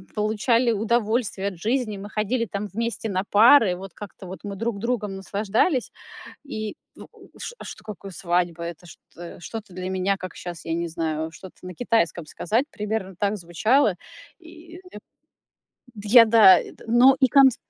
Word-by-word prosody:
получали 225 +3 +1
удовольствие 220 -1 0
от 185 -4 -5
жизни, 225 +2 -1
мы 200 +1 -8
ходили 215 +3 -1
там 205 -1 -5
вместе 230 +1 -3
на 190 -2 -1
пары, 215 -2 +5
вот 190 -1 -10
как-то 200 -1 -11
вот 185 +2 -8
мы 200 -1 -6
друг 225 -1 -3
другом 215 -4 -2
наслаждались. 215 - -1 0.5
И 215 -7 -5 0.2
в - - -16
ш 485 - -6
а - - -10
что 215 - -10
какое 200 -2 -8
свадьба? 175 -1 -1
Это 170 +1 -8
что 170 0 -12
что-то 220 +4 -8
для 185 +1 -5
меня, 190 +1 0
как 185 -2 -8
щас, 175 -3 -8
я 165 - -2
не 170 +1 -2
знаю, 160 -1 -3
что-то 185 +2 -13
на 180 - -7
китайском 180 -8 0
сказать, 225 - -1
примерно 210 -3 -4
так 205 +3 -1
звучало. 205 - +2 0.4
И 335 +1 -14 1.1
д 205 -1 -8
я, 230 +1 +9
да 210 -5 +7 0.3
но 245 +4 +6
и 260 - +5
кон 275 -1 +7
д 250 - -7
205 Hz, 165 wpm, -24 LUFS, 185-230 Hz, 1.1 s, я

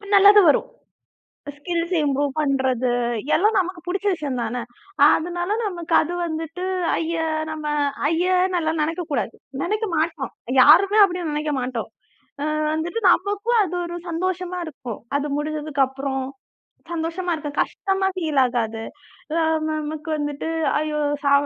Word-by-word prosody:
நல்லது 405 +1 +8
வரும். - - +2 0.9
Skills 335 +3 -3
improve 285 0 +1
பண்றது 265 -3 +1 0.5
எல்லாம் 420 +6 +3
நமக்கு 370 -1 -2
புடிச்ச 385 +3 -2
விஷயம் 280 -6 -4
தானே! 235 +2 -3 0.5
அதனால 350 +2 0 0.2
நமக்கு 345 -4 -3
அது 340 +3 -4
வந்துட்டு, 325 +2 -4 0.3
ஐய! 330 +1 -2 0.3
நம்ம 310 -1 -5 0.4
ஐய்யன்னுல்லாம் 350 -1 +1
நெனைக்க 330 +4 -1
கூடாது. - - -1 0.3
நெனைக்க 425 +5 -1
மாட்டோம். 315 -3 -1 0.3
யாருமே 385 +9 +6
அப்படி 360 -2 -1
நெனைக்க 300 0 -1
மாட்டோம். 245 -3 -3 0.6
அ - - 0 0.3
வந்துட்டு 335 +8 -2
நமக்கும் 410 +6 +1
அது 360 -1 -4
ஒரு 345 - -6
சந்தோஷமா 365 +1 -2
இருக்கும். 260 -8 -7 0.2
அது 285 +1 -2
முடிஞ்சதுக்கு 300 -1 -1
அப்புறம், 270 0 -3 0.7
சந்தோஷமா 340 +2 -2
இருக்கும். 295 -2 -6
கஷ்டமா 385 0 -1
ஃபீல் 310 -6 +1
ஆகாது. 225 -2 -2 0.5
அ - - +2 0.3
நமக்கு 310 0 -4
வந்துட்டு, 290 +1 -3 0.3
"ஐயோ 300 0 -1 0.2
சா 280 - +4
320 Hz, 125 wpm, -22 LUFS, 290-360 Hz, 0.9 s, நல்லது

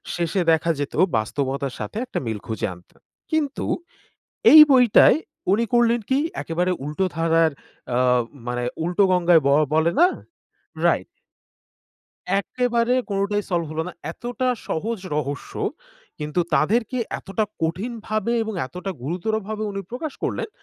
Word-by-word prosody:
শেষে 175 +2 0
দেখা 165 +1 +2
যেত 145 - -3 0.2
বাস্তবতার 135 +4 -2
সাথে 105 - -5
একটা 255 - -3
মিল 110 -2 -3
খুঁজে 110 -1 -2
আনত। 90 0 -18 0.4
কিন্তু 305 -3 -1 0.9
এই 310 - +12
বইটায় 250 +2 +6 0.3
উনি 230 +3 +3
করলেন 240 0 +4
কি 265 - +3 0.2
একেবারে 175 +3 -1
উল্টো 150 +6 -1
ধারার 165 -1 +3 0.4
আ - - +2 0.5
মানে 125 0 -2 0.2
উল্টো 180 +4 +2
গঙ্গায় 175 -2 +5
ব - - +4 0.2
বলে 160 +2 +3
না? 355 - +8 0.8
রাইট। - - +2 1.3
একেবারে 240 +2 0 0.2
কোনটাই 200 +1 0
সলভ 170 -2 0
হল 155 - -2
না। 180 - -8 0.2
এতটা 250 +1 -3 0.2
সহজ 220 +7 -2 0.2
রহস্য 145 -1 -4 0.6
কিন্তু 150 +4 -1
তাদেরকে 225 +9 +1 0.2
এতটা 195 +3 -2 0.2
কঠিন 185 +9 -1
ভাবে 215 +2 -1
এবং 220 -1 -4
এতটা 180 +7 -6
গুরুতর 180 - -2
ভাবে 215 0 -3
উনি 195 - -3
প্রকাশ 270 +4 -4
করলেন - - -2
185 Hz, 135 wpm, -23 LUFS, 160-235 Hz, 1.3 s, এই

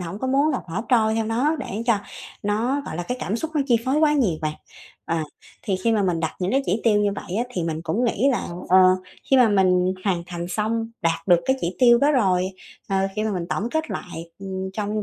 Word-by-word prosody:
hổng 180 +3 -6
có 260 - -3
muốn 275 +4 +3
là 270 - 0
thả 170 +6 -3
trôi 220 -3 +3
theo 225 -1 0
nó 265 +8 +1
để 230 -5 -5
cho 225 -4 +3 0.4
nó 230 +7 0
gọi 155 - -5
là 175 - -2
cái 250 +8 -3
cảm 210 - -2
xúc 320 +5 -4
nó 295 - +2
chi 240 -3 +4
phối 265 +3 +1
quá 305 -1 +4
nhiều 210 - +1
bạn. 155 0 -1 0.5
Ờ, 165 - 0 0.5
thì 195 -4 -1
khi 225 +5 0
mà 210 -2 +2
mình 175 -3 0
đặt 160 - -1
những 180 - 0
cái 270 +2 +2
chỉ 205 +5 0
tiêu 210 -2 +4
như 205 -1 +2
vậy 185 - -5
á, 235 - +1
thì 175 - -2
mình 160 -1 -3
cũng 195 +9 -1
nghĩ 240 +3 +2
là, - - -2 0.2
ờ, 185 +1 +6 0.5
khi 270 - +6
mà 245 -3 +6
mình 185 -2 +3
hoàn 180 -4 0
thành 175 0 -5
xong 225 +3 -1
đạt 165 +2 -1
được 175 -1 +6
cái 265 0 +2
chỉ 175 +2 -3
tiêu 240 -1 +6
đó 285 +3 +3
rồi, 185 -7 +2 0.4
ờ, 195 - 0 0.2
khi 215 - 0
mà 215 - -1
mình 175 -2 -3
tổng 225 +5 -1
kết 315 -1 -2
lại, 170 -1 -6
ừm, 190 -1 -5
trong 210 +1 -2
210 Hz, 250 wpm, -23 LUFS, 180-245 Hz, 0.5 s, ờ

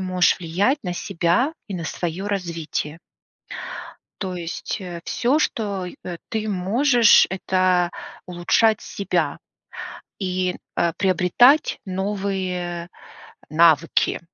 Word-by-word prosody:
можешь 185 -1 +2
влиять- 190 - +1
на 180 -2 -3
себя 180 - +1 0.2
и 195 - -4
на 170 - -4
своё 175 +4 -3
развитие. 165 -5 -3 1.2
То 185 -2 -3
есть, 175 +4 -4
э, 175 -2 -6
всё, 255 +5 +1
что, 205 -10 -1
и 180 - -8
э, 175 -1 -5
ты 220 -1 -2
можешь- 225 +5 +5
это 185 -2 +1 0.4
улучшать 190 +5 +2
себя 200 - -2 0.8
и, 185 -1 -1 0.2
э, 170 -1 +2
приобретать 190 - +4
новые 185 -3 -3 0.6
навыки. 160 0 +3
185 Hz, 105 wpm, -22 LUFS, 175-205 Hz, 1.2 s, можешь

